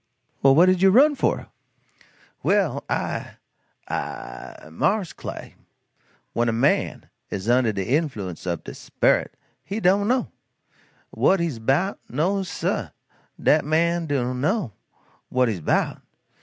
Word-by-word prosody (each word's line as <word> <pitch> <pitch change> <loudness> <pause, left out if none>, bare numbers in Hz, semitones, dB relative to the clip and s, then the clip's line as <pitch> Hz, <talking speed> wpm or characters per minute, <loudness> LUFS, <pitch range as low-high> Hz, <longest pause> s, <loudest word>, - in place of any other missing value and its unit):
"Well 135 0 +6
what 170 +4 +7
did 185 -1 +3
you 195 - +7
run 275 +9 +6
for?" 280 - -1 0.9
"Well, 165 -10 +1
I - - -3 0.5
I 65 +4 -6
mars 190 - 0
Clay, - - -8 0.8
when 120 0 +1
a - - +2
man 120 +5 +1 0.2
is 100 +2 -5
under 120 -1 +3
de 100 -2 -3
influence 120 - -2
ob 85 -1 -2
de - - -7
sperit, - - +1 0.3
he 205 +3 -4
do 195 +1 +3
no, 245 +4 0 0.8
what 195 - +3
he's 165 -9 -2
'bout 140 - +1
no 180 +9 0
sah; 185 - -2 0.5
dat 150 0 +3
man 165 +2 +1
do 130 -4 0
no 150 - -1 0.6
what 130 0 +2
he's 100 -6 -3
'bout. - - 0
150 Hz, 130 wpm, -24 LUFS, 120-190 Hz, 0.9 s, what